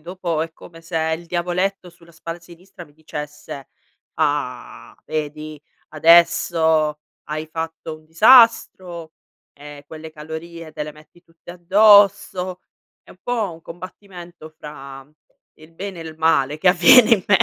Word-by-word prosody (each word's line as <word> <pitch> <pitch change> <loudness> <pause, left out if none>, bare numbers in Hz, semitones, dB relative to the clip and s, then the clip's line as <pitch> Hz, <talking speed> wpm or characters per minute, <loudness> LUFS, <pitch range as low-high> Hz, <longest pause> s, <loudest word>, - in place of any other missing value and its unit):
dopo, 170 -1 -4
è 165 - -6
come 165 0 -15
se 165 0 -7 0.2
il 170 - -14
diavoletto 180 +2 -2
sulla 170 0 -21
spalla 165 +1 -8
sinistra 175 +1 -15
mi 145 - -23
dicesse: 150 -2 -9 0.5
"Ah! 145 -5 -3
Vedi, 155 -1 -6 0.3
adesso 160 -1 +3 0.2
hai 155 +1 -5
fatto 160 0 -6
un 155 - -24
disastro! 185 -5 +4 0.4
E 145 0 -13
quelle 160 +1 -10
calorie 160 +1 -9
te - - -5
le 150 - -9
metti 155 +3 -21
tutte 165 0 -16
addosso." 185 0 +3 0.4
È - - -20
un 185 - -17
po' 225 -7 -2
un 165 0 -15
combattimento 175 -1 -12
fra 135 -2 -11 0.5
il 155 +1 -17
bene 190 -1 -7
e - - -6
il 160 -1 -10
male, 150 -3 +1
che 180 +3 +3
avviene 185 +7 +6
in 205 -5 +3
me 205 -3 +5
165 Hz, 140 wpm, -20 LUFS, 155-180 Hz, 0.5 s, avviene